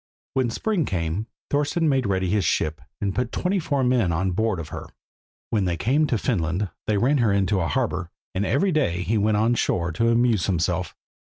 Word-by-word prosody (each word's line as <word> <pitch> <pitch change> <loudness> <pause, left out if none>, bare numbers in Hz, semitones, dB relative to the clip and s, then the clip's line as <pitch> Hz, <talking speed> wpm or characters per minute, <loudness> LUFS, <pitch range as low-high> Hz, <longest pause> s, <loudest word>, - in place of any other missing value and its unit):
When 130 -3 +1
spring 180 - 0
came 85 +4 -2 0.2
Thorston 145 +3 +1
made 135 -5 +2
ready 95 -1 0
his 100 +2 +1
ship 80 -4 0 0.2
and 100 -1 -1
put 125 +2 -1
twenty 190 +2 0
four 145 -5 0
men 125 -8 +2
on 95 +3 0
board 110 0 0
of 80 - -6
her. - - -7 0.6
When 105 -4 +1
they 85 -2 -1
came 135 - +2
to 125 - +1
Finland 95 - -1 0.2
they 105 - +2
ran 130 +7 +2
her 115 -4 +3
into 100 0 +2
a 85 - 0
harbour, 100 -8 -1 0.2
and 95 - 0
every 145 - +2
day 90 - +1
he 110 +3 +1
went 105 +1 +2
on 115 +3 +3
shore 85 -7 0
to 115 +8 +1
amuse 115 -5 +2
himself. 90 -2 -1
105 Hz, 200 wpm, -24 LUFS, 90-125 Hz, 0.6 s, her